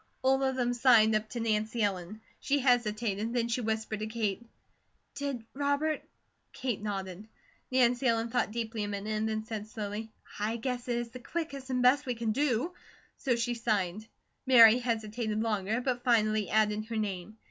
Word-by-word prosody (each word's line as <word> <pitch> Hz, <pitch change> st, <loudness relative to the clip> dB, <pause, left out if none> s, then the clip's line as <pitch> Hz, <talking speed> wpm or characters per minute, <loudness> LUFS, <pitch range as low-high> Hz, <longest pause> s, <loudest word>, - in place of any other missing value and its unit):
All 265 Hz, +1 st, +3 dB
of 265 Hz, -1 st, +1 dB
them 245 Hz, -1 st, 0 dB
signed 235 Hz, -3 st, +5 dB
up 215 Hz, 0 st, 0 dB
to 240 Hz, -, -5 dB
Nancy 220 Hz, 0 st, 0 dB
Ellen. 195 Hz, +1 st, -2 dB, 0.2 s
She 285 Hz, +1 st, +1 dB
hesitated, 230 Hz, -3 st, +1 dB
and 235 Hz, 0 st, 0 dB
she 245 Hz, -, 0 dB
whispered 220 Hz, -1 st, -2 dB
to 215 Hz, -, -3 dB
Kate: 220 Hz, -1 st, -2 dB, 0.7 s
"Did 280 Hz, -5 st, -4 dB
Robert 285 Hz, +2 st, 0 dB, 0.3 s
?" -, -, -46 dB
Kate 250 Hz, -5 st, -3 dB
nodded. 195 Hz, -1 st, -5 dB, 0.4 s
Nancy 250 Hz, 0 st, +3 dB
Ellen 230 Hz, 0 st, +1 dB
thought 245 Hz, -1 st, 0 dB
deeply 225 Hz, -1 st, -3 dB
a -, -, -2 dB
minute 205 Hz, +1 st, -4 dB
and 215 Hz, +1 st, 0 dB
then 215 Hz, 0 st, -2 dB
said 220 Hz, -2 st, -5 dB
slowly: 215 Hz, 0 st, -5 dB, 0.3 s
"I 215 Hz, +3 st, -1 dB
guess 245 Hz, +1 st, -3 dB
it 240 Hz, -1 st, 0 dB
is 240 Hz, 0 st, -3 dB
the 255 Hz, +2 st, -9 dB
quickest 280 Hz, -1 st, -5 dB
and 250 Hz, -1 st, 0 dB
best 265 Hz, +3 st, +4 dB
we 250 Hz, -, -1 dB
can 225 Hz, -1 st, -1 dB
do." 275 Hz, +5 st, 0 dB, 0.4 s
So 255 Hz, -4 st, +1 dB
she 240 Hz, +1 st, -1 dB
signed. 215 Hz, -3 st, -1 dB, 0.4 s
Mary 235 Hz, -2 st, +8 dB
hesitated 220 Hz, -2 st, -2 dB
longer, 215 Hz, +1 st, 0 dB
but 245 Hz, -1 st, -2 dB
finally 215 Hz, -4 st, +2 dB
added 215 Hz, 0 st, +2 dB
her 225 Hz, 0 st, -4 dB
name. 210 Hz, 0 st, -4 dB
225 Hz, 180 wpm, -30 LUFS, 215-250 Hz, 0.7 s, Mary